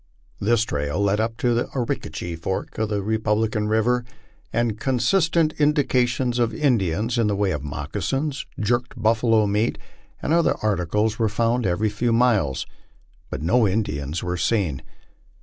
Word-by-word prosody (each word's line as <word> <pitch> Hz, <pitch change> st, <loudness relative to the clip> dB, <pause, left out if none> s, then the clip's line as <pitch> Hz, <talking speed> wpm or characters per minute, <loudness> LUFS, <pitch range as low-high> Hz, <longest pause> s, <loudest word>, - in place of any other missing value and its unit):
This 115 Hz, +2 st, +2 dB
trail 75 Hz, -2 st, -2 dB
led 100 Hz, +1 st, +2 dB
up 115 Hz, +1 st, -1 dB
the 120 Hz, -1 st, +1 dB
Arickaree 115 Hz, -8 st, -3 dB
fork 90 Hz, +6 st, -4 dB
of 110 Hz, -1 st, 0 dB
the 100 Hz, -2 st, -1 dB
Republican 110 Hz, 0 st, 0 dB
river, 115 Hz, +3 st, +2 dB, 0.5 s
and 115 Hz, -2 st, 0 dB
con 130 Hz, 0 st, 0 dB
stant 160 Hz, +4 st, +2 dB
indications 130 Hz, -4 st, +2 dB
of 120 Hz, -1 st, +1 dB
Indians, 115 Hz, -, +1 dB
in 115 Hz, -, +3 dB
the 105 Hz, -, +1 dB
way 100 Hz, -1 st, +1 dB
of 75 Hz, -, -2 dB
moccasins, 105 Hz, -, -3 dB
jerked 120 Hz, +3 st, -1 dB
buffalo 110 Hz, 0 st, +3 dB
meat, 105 Hz, +3 st, 0 dB, 0.4 s
and 155 Hz, -, -1 dB
other 170 Hz, -1 st, +3 dB
articles, 105 Hz, +3 st, 0 dB
were 110 Hz, -2 st, +2 dB
found 115 Hz, +1 st, +1 dB
every 105 Hz, +5 st, +1 dB
few 115 Hz, +3 st, -1 dB
miles, 115 Hz, -, +2 dB, 0.6 s
but -, -, -5 dB
no 110 Hz, +6 st, +3 dB
Indians 80 Hz, -7 st, -2 dB
were 90 Hz, 0 st, -2 dB
seen. 90 Hz, -, 0 dB
110 Hz, 150 wpm, -23 LUFS, 100-120 Hz, 0.6 s, in